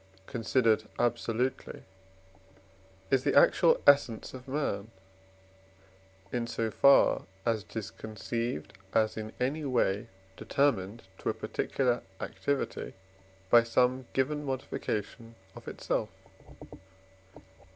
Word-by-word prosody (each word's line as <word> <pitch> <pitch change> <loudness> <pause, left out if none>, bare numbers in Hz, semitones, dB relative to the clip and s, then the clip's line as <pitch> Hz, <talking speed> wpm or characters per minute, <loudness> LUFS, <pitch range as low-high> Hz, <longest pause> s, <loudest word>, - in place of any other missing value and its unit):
considered 115 -1 +1
absolutely 120 +1 -1 1.3
is 130 -1 +3
the - - +1
actual 165 +3 +5
essence 140 -6 +4
of 130 0 -10
man, 130 -7 -2 1.4
in 120 -1 -2
so 115 -1 -2
far 140 -2 +5 0.2
as 115 -2 +1
it - - -18
is 110 -3 -4
conceived 115 +3 -4 0.2
as 110 -1 +3
in 110 0 -5
any 140 +5 -1
way 115 -7 +1 0.3
determined 115 -6 0 0.2
to - - -2
a - - -1
particular 125 -3 -1 0.2
activity 135 - -3 0.6
by 120 - +9
some 125 +2 +1
given 150 +3 0
modification 115 -4 -4 0.2
of - - -12
itself. - - -2
120 Hz, 100 wpm, -30 LUFS, 110-135 Hz, 1.4 s, by